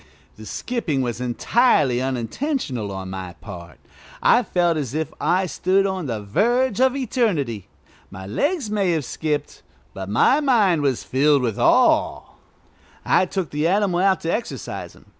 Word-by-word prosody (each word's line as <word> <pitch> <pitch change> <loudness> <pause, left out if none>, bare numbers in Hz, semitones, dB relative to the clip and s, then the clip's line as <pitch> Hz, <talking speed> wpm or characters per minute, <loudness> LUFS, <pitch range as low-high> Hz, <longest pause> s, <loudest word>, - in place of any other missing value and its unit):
The 110 0 -11
skipping 175 - -2
was 120 -1 -3
entirely 130 - +2
unintentional 130 - -3
on 95 -1 -6
my 95 -2 -6
part. 85 - -11 0.4
I - - +4
felt 175 -6 +1
as 140 -3 -3
if 160 0 -3
I 185 +1 +2
stood 190 +2 +1
on 190 -5 -2
the 115 -4 -3
verge 240 - +1
of 260 0 +3
eternity. 200 - -1 0.4
My 95 -1 -9
legs 275 - -1
may 195 -4 +1
have 155 -5 -1
skipped, 150 0 -3 0.3
but 95 0 -7
my 120 - +4
mind 215 - +3
was 135 -4 0
filled 140 +1 +2
with 115 -4 -2
awe. - - +3 0.8
I 185 - +3
took 185 -4 -3
the 150 +2 0
animal 190 -1 +1
out 190 0 +2
to 165 - -1
exercise 235 - -5
him. - - -20
160 Hz, 155 wpm, -22 LUFS, -, 0.8 s, I